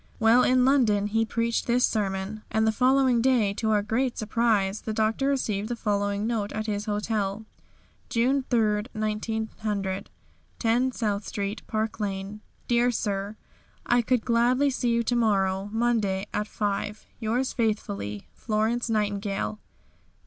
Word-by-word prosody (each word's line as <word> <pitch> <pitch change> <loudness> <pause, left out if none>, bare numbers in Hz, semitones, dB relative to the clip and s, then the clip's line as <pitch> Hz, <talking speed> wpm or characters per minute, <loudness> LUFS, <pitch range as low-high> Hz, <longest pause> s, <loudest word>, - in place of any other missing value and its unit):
While 225 +2 +5
in 255 0 +4
London 230 -7 +3
he 225 +2 +1
preached 230 +1 -1
this 245 +1 +4
sermon, 200 0 -2
and 220 0 +1
the 220 - +3
following 255 +1 +3
day 235 -6 +3
to 220 +2 -2
our 210 -1 +2 0.3
surprise 215 -3 +1
the 220 - -4
Doctor 220 +5 +1
received 220 -6 -1
the 240 - -1
following 205 -2 -1
note 220 -3 -1
at 215 0 -3
his 210 -1 -2
hotel: 210 -1 -2 0.6
"June 260 +4 +2
3, 215 -3 +2
1900. 215 -2 -3 0.5
"10, 245 +3 +2
South 210 -4 -2
Street, 200 +2 -3
"Park 220 0 -2
Lane. 200 0 -4 0.3
"Dear 240 0 +3
Sir 205 -3 -2 0.5
"I 240 0 +3
could 240 0 0
gladly 250 +4 +3
see 250 -2 -1
you 235 0 +2
to 240 - 0
morrow 195 -4 +1
(Monday) 220 -4 +1
at 210 0 -1
5. 205 0 -3
Yours 240 +3 -1
faithfully, 105 - -2
"FLORENCE 225 +2 -1
NIGHTINGALE. 200 - -1
220 Hz, 140 wpm, -26 LUFS, 205-235 Hz, 0.6 s, While